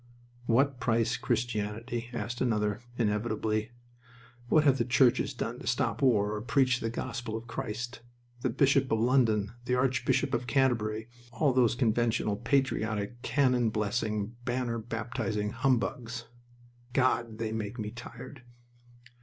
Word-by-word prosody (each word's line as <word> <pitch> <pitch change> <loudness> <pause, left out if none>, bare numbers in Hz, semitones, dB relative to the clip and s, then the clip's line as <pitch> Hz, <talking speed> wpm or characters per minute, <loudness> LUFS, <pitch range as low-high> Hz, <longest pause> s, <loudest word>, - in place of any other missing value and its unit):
"What 135 +3 +3
price 115 0 +1
Christianity?" 120 -1 -2
asked 120 0 -4
another, 105 -3 +1 0.2
inevitably. 110 0 0 0.8
"What 155 +2 +5
have 140 -3 +4
the - - +3
churches 125 +1 +3
done 120 0 -4
to - - -9
stop 115 -2 0
war 105 -6 +3
or 105 - -3
preach 125 +1 +2
the 115 - -2
gospel 120 -1 -4
of 115 - -8
Christ? 120 0 -5 0.4
The 130 - +1
Bishop 135 +2 +3
of 110 - +2
London, 115 -4 +3
the 125 - +1
Archbishop 130 0 +1
of 125 - -1
Canterbury, 115 -4 +1 0.2
all 135 +3 +2
those 125 -2 +3
conventional, 115 -3 +1
patriotic, 115 -2 0
cannon 125 -5 +2
blessing, 105 0 -1
banner 120 -1 -1
baptizing 115 -2 -3
humbugs. 120 -1 -1 0.7
God! 125 -4 +1
They 110 -1 -2
make 110 +1 -4
me 105 -2 -4
tired!" 125 +2 -10
120 Hz, 130 wpm, -30 LUFS, 110-125 Hz, 0.8 s, What